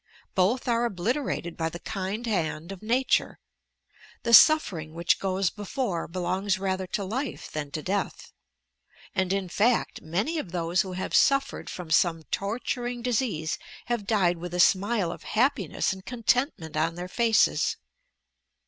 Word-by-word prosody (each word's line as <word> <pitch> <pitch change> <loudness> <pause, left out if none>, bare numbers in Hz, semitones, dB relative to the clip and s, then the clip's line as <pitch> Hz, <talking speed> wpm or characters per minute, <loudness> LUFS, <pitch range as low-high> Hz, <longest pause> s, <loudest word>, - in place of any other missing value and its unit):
Both 205 +8 +1
are 235 -1 +2
obliterated 210 - -2
by 160 0 -1
the 170 - -7
kind 200 +4 -4
hand 170 -5 -2
of 195 - -8
nature. 245 +4 +1 0.9
The 235 - 0
sof 310 +6 +8
fering 155 -3 -7
which 170 +1 +1
goes 190 -1 0
before 205 -3 -3
belongs 185 +3 -1
rather 190 -1 -2
to 200 - -2
life 240 +7 -4
than 150 -2 -4
to 150 +1 -5
death, 200 +2 -3 0.8
and, 190 -2 0
in 195 -1 0
fact, 225 +7 +1
many 205 - -1
of 190 - -6
those 170 0 +1
who 190 -1 -5
have 185 - -4
suffered 275 0 +2
from 175 -3 -7
some 165 0 +3
torturing 240 +3 -2
disease 210 -10 -1 0.3
have 235 -4 -2
died 185 -6 +2
with 175 +1 -5
a - - -2
smile 195 0 +3
of - - -8 0.2
happiness 265 -4 +1
and 190 0 -10
contentment 235 - 0
on 160 +2 0
their 175 +1 -5
faces. 225 +3 +2
195 Hz, 150 wpm, -27 LUFS, 175-235 Hz, 0.9 s, sof